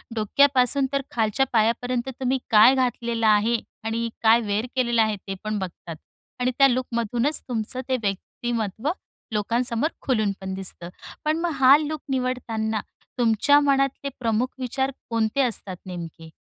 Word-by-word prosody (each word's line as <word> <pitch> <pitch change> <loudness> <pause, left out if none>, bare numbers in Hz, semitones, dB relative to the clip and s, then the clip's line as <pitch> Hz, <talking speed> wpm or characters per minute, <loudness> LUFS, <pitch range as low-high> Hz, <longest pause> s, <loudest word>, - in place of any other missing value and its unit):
डोक्यापासून 265 +4 +3
तर 275 - +1
खालच्या 225 +3 +1
पायापर्यंत 240 +3 +1
तुम्ही 260 0 +1
काय 220 +4 +7
घातलेल 235 -2 -1
आहे 215 +2 +4 0.3
आणि 230 +1 -1 0.2
काय 225 +1 +6
वेअर 210 +1 -1
केलेलं 240 -3 +2
आहे 215 -1 +1
ते 195 - -3
पण 215 -1 -2
बघतात. 175 -3 -7 0.4
आणि 250 +1 +1
त्या 275 -1 +7
लूकमधूनच 245 +2 -1
तुमचं 245 +1 -3
ते 260 - +2
व्यक्तिमत्त्व 220 +3 -3 0.4
लोकांसमोर 235 +6 0
खुलून 215 -6 +1
पण 190 0 -4
दिसतं. 185 -2 -5 0.4
पण 310 +1 +1
मग 345 0 -1
हा 265 +1 +8
लूक 305 0 -4
निवडताना, 230 -4 -1 0.4
तुमच्या 240 +4 +4
मनातले 275 -1 +1
प्रमुख 230 0 +1
विचार 265 +2 -1 0.2
कोणते 230 +3 +1
असतात 210 -7 -1
नेमके? 170 -3 -8
235 Hz, 140 wpm, -24 LUFS, 215-260 Hz, 0.4 s, हा